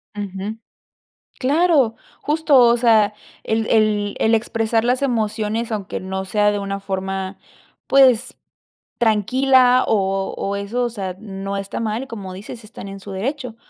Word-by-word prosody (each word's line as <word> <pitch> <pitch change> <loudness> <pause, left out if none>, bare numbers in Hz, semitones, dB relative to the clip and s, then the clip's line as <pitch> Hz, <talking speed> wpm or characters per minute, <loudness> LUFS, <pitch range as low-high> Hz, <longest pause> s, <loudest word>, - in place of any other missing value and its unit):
Ujú. 200 +2 -5 0.8
Claro, 280 -4 +3 0.3
justo, 300 -1 +1
o 240 0 +5
sea, 220 -3 +4 0.3
el 220 0 0
el 210 -2 +2
el 225 +1 +3
expresar 225 0 0
las 250 +2 +1
emociones, 225 -2 -1
aunque 205 -4 -4
no 190 +1 -4
sea 210 +2 +2
de 205 - -2
una 200 0 -4
forma, 190 0 -4 0.5
pues 260 -3 +4 0.6
tranquila 250 +3 +4
o 195 -2 0
o 200 +1 -3
eso, 210 +5 -2
o 240 - 0
sea, 190 -5 -5
no 195 -1 -5
está 195 0 -5
mal 225 +2 -2
y 270 - -10
como 195 -6 -7
dices, 215 +4 -9
están 210 -2 -10
en 195 0 -8
su 195 0 -10
derecho. 250 +4 -4
215 Hz, 150 wpm, -20 LUFS, 195-240 Hz, 0.8 s, o